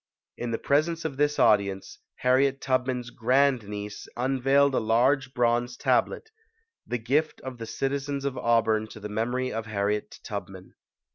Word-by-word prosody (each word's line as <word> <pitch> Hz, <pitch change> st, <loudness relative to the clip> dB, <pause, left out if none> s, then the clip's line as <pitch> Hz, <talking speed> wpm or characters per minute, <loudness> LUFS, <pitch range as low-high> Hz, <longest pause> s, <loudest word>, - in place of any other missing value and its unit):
In 120 Hz, -, -4 dB
the 115 Hz, -, -1 dB
presence 160 Hz, +4 st, 0 dB
of 140 Hz, -4 st, -3 dB
this 145 Hz, +1 st, +1 dB
audience, 100 Hz, -2 st, +2 dB, 0.2 s
Harriet 135 Hz, +2 st, +3 dB
Tub 130 Hz, -1 st, 0 dB
man's 125 Hz, -2 st, -3 dB
grand 130 Hz, -1 st, +2 dB
niece 105 Hz, 0 st, -6 dB
unveiled 135 Hz, +2 st, +2 dB
a -, -, +2 dB
large 125 Hz, +5 st, +2 dB
bronze 120 Hz, 0 st, +1 dB
tablet 445 Hz, -, 0 dB, 0.6 s
the 125 Hz, -, -1 dB
gift 140 Hz, +7 st, 0 dB
of 130 Hz, -2 st, -7 dB
the 115 Hz, -, -6 dB
citizens 140 Hz, +2 st, -2 dB
of 140 Hz, -2 st, -1 dB
Auburn 110 Hz, -3 st, +2 dB
to 110 Hz, -, -11 dB
the 105 Hz, 0 st, -7 dB
memory 120 Hz, +4 st, -1 dB
of 110 Hz, 0 st, -4 dB
Harriet 105 Hz, 0 st, -2 dB
Tubman. -, -, -7 dB
125 Hz, 155 wpm, -27 LUFS, 110-135 Hz, 0.6 s, Harriet